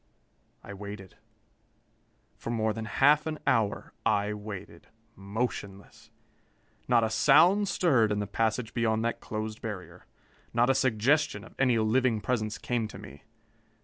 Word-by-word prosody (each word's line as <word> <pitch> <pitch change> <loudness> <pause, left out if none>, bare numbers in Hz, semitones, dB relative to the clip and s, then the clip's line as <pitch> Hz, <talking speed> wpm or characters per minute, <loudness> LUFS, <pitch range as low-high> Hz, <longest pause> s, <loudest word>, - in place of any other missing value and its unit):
I 100 - -9
waited. 100 -1 -9 1.2
For - - -8
more 110 -2 0
than 110 0 -5
half 145 +6 +3
an 155 -1 -3
hour 110 -5 0
I 105 0 +1
waited, 105 -2 -9 0.3
motionless. 100 -1 -5 0.8
Not 120 -2 +4
a 110 - +1
sound 200 - +5
stirred 130 - +2
in 105 - 0
the 105 - -1
passage 110 +2 -1
beyond 110 -1 0
that 115 - -1
closed 110 0 -5
barrier. 105 -5 -8 0.5
Not 120 +2 +4
a - - +3
suggestion 130 -1 +1
of 110 - -14
any 125 -3 +3
living 115 +1 +2
presence 110 -1 -2
came 120 -3 -2
to - - -11
me. 70 +2 -12
110 Hz, 140 wpm, -28 LUFS, 105-125 Hz, 1.2 s, sound